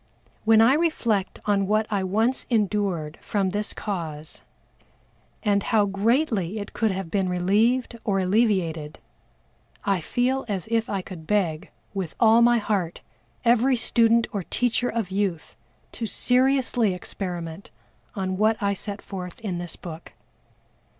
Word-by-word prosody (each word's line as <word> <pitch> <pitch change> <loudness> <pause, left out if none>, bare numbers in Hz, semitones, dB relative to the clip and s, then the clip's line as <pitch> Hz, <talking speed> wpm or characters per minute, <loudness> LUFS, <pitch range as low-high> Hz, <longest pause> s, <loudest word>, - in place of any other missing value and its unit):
When 220 0 +6
I 235 +4 +6
reflect 245 - 0
on 200 -2 +2
what 215 +2 +2
I 195 -2 +1
once 220 +7 0
endured 200 -8 0
from 195 -3 -1
this 210 +2 -2
cause, 160 -7 -5 1.0
and 205 -2 +2
how 215 -2 +2
greatly 210 - +1
it 205 -1 -6
could 225 - +1
have 190 -3 -4
been 190 -2 +1
relieved 220 +7 +1
or 200 -3 0
alleviated, 185 -6 +1 0.9
I 195 -3 +1
feel 250 - 0
as 195 -4 -3
if 230 -1 +1
I 195 -2 -2
could 165 -5 -10
beg, 190 -4 0 0.2
with 190 -5 -4
all 225 0 +6
my 240 0 +5
heart, 200 -6 -1 0.4
every 245 +3 +4
student 230 0 +3
or 200 - -1
teacher 245 +6 0
of 220 -5 -2
youth 190 -4 -2 0.4
to 230 - -4
seriously 250 -5 +2
experiment 175 -1 -6 0.5
on 190 -2 -2
what 215 +2 +3
I 200 -2 +1
set 200 +1 -5
forth 180 -3 -7
in 185 -6 -3
this 175 -1 -5
book. 165 -1 -9
205 Hz, 140 wpm, -25 LUFS, 185-230 Hz, 1.0 s, When